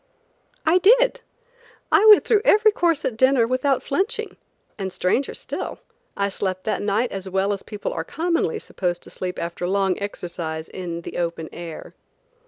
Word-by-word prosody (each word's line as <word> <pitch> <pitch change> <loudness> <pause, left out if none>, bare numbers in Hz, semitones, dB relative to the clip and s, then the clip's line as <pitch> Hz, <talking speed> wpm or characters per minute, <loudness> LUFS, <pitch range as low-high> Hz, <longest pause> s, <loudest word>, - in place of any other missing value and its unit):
I 330 +3 +5
did. - - +4 0.7
I 410 - +5
went 425 -1 +8
through 430 -3 +3
every 430 +1 +5
course 340 -6 +1
at 240 - -1
dinner 260 0 +4
without 255 +2 +1
flinching, 385 +10 -2 0.4
and 190 -1 -3
stranger 185 +10 0
still, - - -5 0.4
I 200 - +1
slept 185 -1 -3
that 220 - -1
night 210 +4 0
as 195 -1 -5
well 195 +2 +1
as 195 - -5
people 210 -1 -5
are - - -3
commonly 345 +7 -1
supposed 175 - -3
to - - -12
sleep 180 -1 -5
after 170 +1 -3
long 195 -1 +1
exercise 170 -5 -5
in 170 -2 -6
the - - -6
open 170 -2 -3
air. 170 -2 -8
200 Hz, 165 wpm, -23 LUFS, -, 0.7 s, went